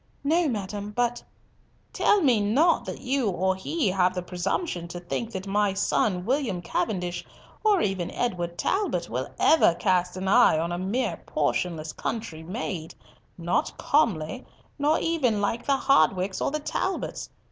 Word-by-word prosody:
"No, 325 +4 +2
madam, 205 -3 -4
but—" 240 0 0 0.7
"Tell 415 - +3
me 255 -8 +4
not 275 +12 +3
that - - -6
you 260 -3 0
or 190 +1 0
he 230 - -1
have 185 0 +2
the 180 - -2
presumption 180 - -2
to 175 +1 -7
think 200 +6 -4
that 190 -3 -5
my 200 0 +1
son 195 -2 +1
William 245 -7 0
Cavendish 175 0 -2 0.4
or 415 -4 +4
even 190 -3 -1
Edward 175 -7 -2
Talbot 400 - -1
will - - -2
ever 315 - +5
cast 180 -1 +1
an 190 +1 -3
eye 230 -5 +5
on 165 +2 -1
a 175 - -2
mere 205 +8 -1
portionless 160 -3 -1
country 220 -9 -4
maid, 175 -2 -5 0.4
not 175 0 -1
comely, 235 - +1 0.4
nor 300 +3 +3
even 270 -10 +1
like 205 +3 -1
the 275 -1 +3
Hardwickes 190 - +2
or - - +1
the 305 +2 -2
Talbots. 375 +5 -3
200 Hz, 155 wpm, -26 LUFS, 180-260 Hz, 0.7 s, ever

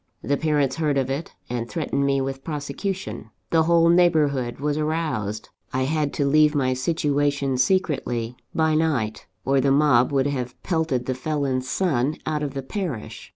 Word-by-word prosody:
The 145 - +1
parents 145 -3 +1
heard 150 -3 +1
of 135 -1 0
it, 145 +5 -4
and 120 -1 -3
threatened 140 -4 -1
me 135 0 +2
with 135 0 -4
prosecution; 150 - -4 0.2
the 165 - +4
whole 165 +1 +4
neighbourhood 155 -8 +3
was 145 +1 0
aroused. 150 -10 -2 0.2
I 130 +1 +1
had 150 +1 0
to 145 - 0
leave 150 +1 +4
my 130 -3 +2
situation 145 -1 0
secretly, 130 -8 0 0.2
by 160 -1 +2
night, 145 -9 0 0.2
or 135 0 +3
the 140 - +2
mob 140 -3 +4
would 135 -1 +2
have 125 -4 -3
pelted 160 -8 0
the 130 - -1
felon's 130 -2 -2
son 150 -5 0
out 155 -1 -1
of 140 -2 -3
the 135 - -3
parish. 160 - -5
140 Hz, 165 wpm, -24 LUFS, 130-155 Hz, 0.2 s, the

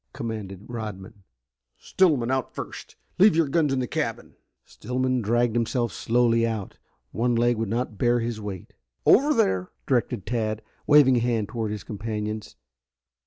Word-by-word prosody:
commanded 105 -4 -6
Rodman. 105 -3 -7 0.6
"Stillman 145 -10 +2
out 130 -1 -2
first. - - -8 0.2
Leave 200 -2 +6
your 165 -2 +3
guns 150 0 +1
in 135 - +1
the 130 - 0
cabin!" - - -3 0.3
Stillman 130 +1 -2
dragged 120 +2 +1
himself 120 -2 0
slowly 115 +3 +2
out. 110 -4 -3 0.3
One 120 +2 0
leg 120 0 +2
would 110 -2 -2
not 115 -1 -3
bear 120 0 +3
his 115 -2 -3
weight. 100 -4 -7 0.3
"Over 285 +5 +5
there," 95 - +1 0.2
directed 120 -5 0
Tad, 110 -2 -2 0.2
waving 145 -4 +6
a - - +3
hand 115 -3 0
toward 115 -3 -3
his 105 -1 -5
companions. 105 0 -5
115 Hz, 150 wpm, -25 LUFS, 110-125 Hz, 0.6 s, Leave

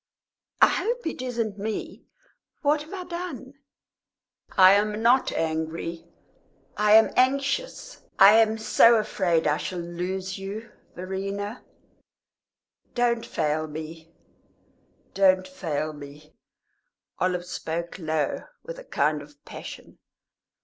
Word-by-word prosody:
"I - - +8
hope 485 +2 -2
it 320 - -3
isn't 230 -5 -3
me. 215 +1 -5 0.6
What 295 +1 +2
have 305 - -11
I 375 -2 -5
done?" 340 -7 -7 1.0
"I 185 0 +9
am 210 +2 +1
not 250 +3 +4
angry 165 +1 -3 0.7
I 210 0 +3
am 220 +1 +7
anxious. 275 - 0 0.2
I 195 +2 +9
am 220 -1 +3
so 230 +1 +5
afraid 185 -6 +1
I 150 0 +2
shall 185 - -5
lose 180 +2 -4
you. 210 +4 -7 0.2
Verena, 195 +4 -5 1.3
don't 240 -2 +1
fail 155 0 -1
me 160 +2 -9 1.0
don't 185 -1 +3
fail 155 -5 -3
me!" 150 +1 -12 0.9
Olive 180 -1 0
spoke 170 0 -5
low, 155 -3 -2 0.2
with - - -8
a - - -10
kind 150 - 0
of 145 0 -17
passion. - - -10
195 Hz, 115 wpm, -25 LUFS, 165-235 Hz, 1.3 s, I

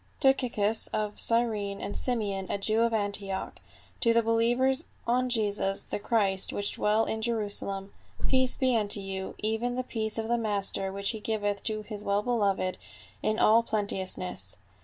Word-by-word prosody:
"' - - -35
T 270 - +6
UCIUS 225 -5 +1
of 210 -1 -2
Cyrene 215 -4 +2
and 205 - -5
Simeon 205 -6 -1
a - - -1
Jew 215 +3 +1
of 235 0 +3
Antioch, 200 -3 -2
i - - -26
^ - - -32
to 230 -2 +4
the 230 0 +3
believers 240 +5 +2 0.2
on 250 +2 +1
Jesus 205 -4 0
the - - -4
Christ 200 -3 +1
which 205 0 -2
dwell 215 +2 +1
at 220 - -2
Jerusalem: 205 -3 -2 0.3
Peace 260 -1 +3
be 255 -2 +2
unto 210 -2 +3
you, 190 -1 -5
even 225 +3 -1
the 255 - -1
peace 220 -3 -1
of 220 0 -2
the 235 +1 +1
master, 200 -3 0
which 200 +1 +1
he 220 - -6
giveth 205 -2 -2
to 215 -1 -2
his 210 -1 -6
well 200 +1 +1
beloved 200 -6 0 0.4
in 215 - 0
all 225 +1 +5
plenteousness. 190 - -3
215 Hz, 180 wpm, -28 LUFS, 200-230 Hz, 0.4 s, T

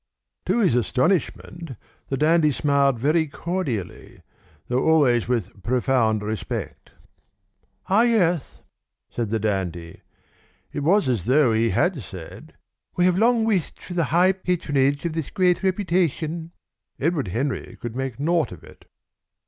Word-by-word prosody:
To - - +2
his 190 - +3
astonishment 150 - -1 0.3
the 135 - -2
dandy 155 +1 +3
smiled 140 -2 +2
very 155 +6 +1
cordially, 140 - -5 0.4
though 125 +1 0
always 135 -8 +3
with 115 -5 -2
profound 115 -3 +1
respect. 110 -1 -5 1.0
"Ah, 200 +4 +3
yes!" 180 - +1 0.5
said 115 -3 -3
the 115 - 0
dandy. 95 -6 -3 0.7
It - - -3
was 170 +3 +2
as 115 -8 -1
though 130 -1 +4
he 115 +1 +2
had 175 -1 +1
said: 90 -4 -11 0.4
"We 180 - +2
have 180 0 +2
long 230 0 +3
wished 200 -8 -1
for 180 - -9
the 170 -2 +1
high 175 +7 +4
patronage 145 -7 0
of 170 - -1
this 160 -3 -3
great 180 -1 +2
reputation." 170 -4 -1 0.5
Edward 150 - 0
Henry 130 +9 -3
could 120 -1 -6
make 130 -2 -4
naught 165 +2 +1
of 90 - -11
it. - - -16
145 Hz, 135 wpm, -23 LUFS, 120-175 Hz, 1.0 s, though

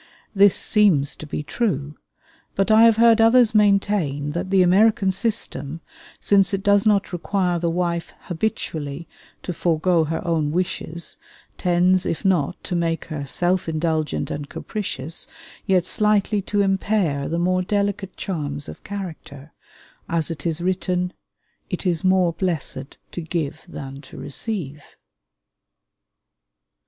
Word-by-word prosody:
This 200 -1 +5
seems 185 -10 +3
to 155 - -9
be 150 - -4
true; 150 - -2 0.6
but 195 +3 +1
I 220 +1 +7
have 225 -1 +5
heard 230 -1 +6
others 230 0 +5
maintain 200 -9 +2
that 175 +4 -3
the 190 -1 +4
American 195 +2 +4
system, 180 - -2 0.4
since 195 -1 +3
it 195 - -6
does 205 0 +4
not 200 -3 +2
require 180 0 0
the 170 0 0
wife 170 0 -1
habitually 160 -5 -3 0.4
to 180 - -3
forego 165 0 +2
her 160 +3 -3
own 155 -3 +1
wishes, 170 -1 -3 0.4
tends, 180 +1 +2
if 165 - -3
not 180 -3 +1
to 180 - -3
make 165 -1 -1
her 145 -2 -4
self 175 +4 0
indulgent 155 -1 -1
and 145 -1 -5
capricious, 165 -8 -4 0.4
yet 185 -2 +3
slightly 210 +1 +2
to 205 +1 0
impair 195 -7 0
the 165 - -1
more 185 +1 +1
delicate 200 0 -2
charms 145 -5 -4
of - - -10
character; 160 -7 -8 0.6
as 165 0 -1
it 160 0 -4
is 165 0 -1
written, 180 0 -1 0.6
"It - - -4
is 170 -3 0
more 185 -2 +3
blessed 155 -6 -2
to 175 - -5
give 160 -2 -3
than 135 -4 -8
to 135 - -13
receive." 150 - -5
180 Hz, 135 wpm, -22 LUFS, 155-200 Hz, 0.6 s, I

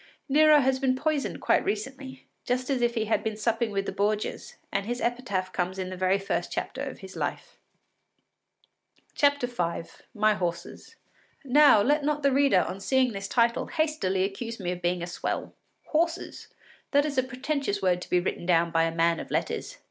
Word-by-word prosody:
Nero 305 +1 +6
has 265 0 +1
been 260 -1 +2
poisoned 295 +1 -1
quite - - +3
recently, 265 +4 -5 0.2
just 255 +2 -1
as 260 -3 0
if 240 0 +1
he 220 -1 0
had 220 - 0
been 220 -1 -3
supping 230 +1 0
with 195 -1 -2
the - - -3
Borgias, 210 +1 -2 0.2
and 200 +1 -2
his 245 +1 -2
epitaph 205 -7 -2
comes 180 +1 -2
in 185 -1 -4
the - - -5
very 185 +1 +2
first 195 0 -3
chapter - - -4
of - - -5
his - - -10
life.) - - -4 1.6
V 285 - +6 0.9
MY 215 0 +3
HORSES 180 - -5 0.5
Now 280 -5 +6
let 295 +4 +2
not 295 0 -1
the 280 - +4
reader, 270 -8 +4
on 185 +2 -4
seeing 255 +4 +2
this 195 0 -5
title, 235 +2 +1
hastily 300 - 0
accuse 225 +4 -4
me 180 -2 -2
of 180 0 -5
being 175 0 0
a - - -1
swell. 175 - -4 0.3
Horses! 335 +3 -1 0.4
That 285 0 +3
is 285 -3 0
a - - +2
pretentious 255 -5 -3
word 180 -1 +2
to - - -9
be 180 - +3
written 175 -1 -3
down 170 -1 +3
by 165 -1 +3
a 165 0 -3
man 165 0 +2
of - - -7
letters! - - -2
230 Hz, 185 wpm, -27 LUFS, 185-270 Hz, 1.6 s, Nero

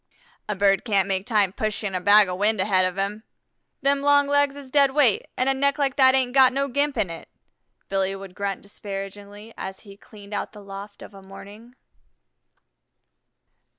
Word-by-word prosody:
"A 210 - -1
bird 195 -1 +2
can't 200 -4 +1
make 190 0 -2
time 205 -5 +1
pushing 210 -2 -3
a 185 - -2
bag 205 +1 +6
of 180 0 -5
wind 215 +1 +3
ahead 190 -1 +2
of 185 0 -3
him. 200 +2 -2 0.6
Them 280 0 +2
long 285 0 +4
legs 285 0 +1
is 280 -2 -12
dead 280 -1 +3
weight, 265 -9 +3
an' 255 - +1
a 270 - +4
neck 280 +2 +1
like 275 -3 0
that 260 -1 +5
ain't 255 -2 0
got 265 -1 +6
no 275 +1 -1
gimp 285 +1 -1
in 200 -6 -1
it," 165 - -10 0.6
Billy 195 0 -1
would 195 -1 -10
grunt 200 0 -4
disparagingly 200 +2 -9
as 190 0 -7
he 200 -2 -14
cleaned 205 0 -14
out 205 - -4
the 210 -1 -12
loft 200 +1 -10
of - - -13
a 195 - -13
morning. 205 +5 -13
210 Hz, 185 wpm, -23 LUFS, 195-265 Hz, 0.6 s, bag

